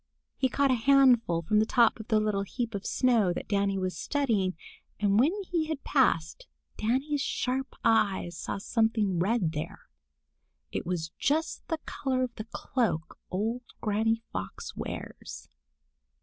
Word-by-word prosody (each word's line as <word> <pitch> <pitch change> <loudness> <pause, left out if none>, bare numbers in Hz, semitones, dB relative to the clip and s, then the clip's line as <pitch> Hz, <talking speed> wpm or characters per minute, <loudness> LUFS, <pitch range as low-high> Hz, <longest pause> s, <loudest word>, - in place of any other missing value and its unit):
He 260 - +1
caught 275 +3 +2
a - - +5
handful 245 -8 +4
from 210 +5 +2
the 215 - +4
top 235 -1 +4
of 220 - -8
the 215 -2 +3
little 210 -2 0
heap 225 +3 -3
of 200 -1 -4
snow 235 -8 +3
that - - -6
Danny 200 -1 +1
was 185 -1 -2
studying, 215 - 0 0.4
and 205 0 +3
when 280 +7 +5
he 340 -4 -1
had 310 -3 -4
passed, 265 - +1 0.3
Danny's 270 +6 0
sharp 265 +1 -2
eyes 200 -6 +2
saw - - -4
something 215 -3 +1
red 190 -2 +1
there. 150 0 -5 0.9
It - - -4
was 170 -3 -2
just 315 +3 0
the 325 - -1
color 260 -2 -1
of 250 -2 -3
the 215 - -7
cloak 220 - -2
old 225 +6 -1 0.2
Granny 225 +2 +1
Fox - - -5
wears. - - -7
225 Hz, 150 wpm, -29 LUFS, 195-260 Hz, 0.9 s, a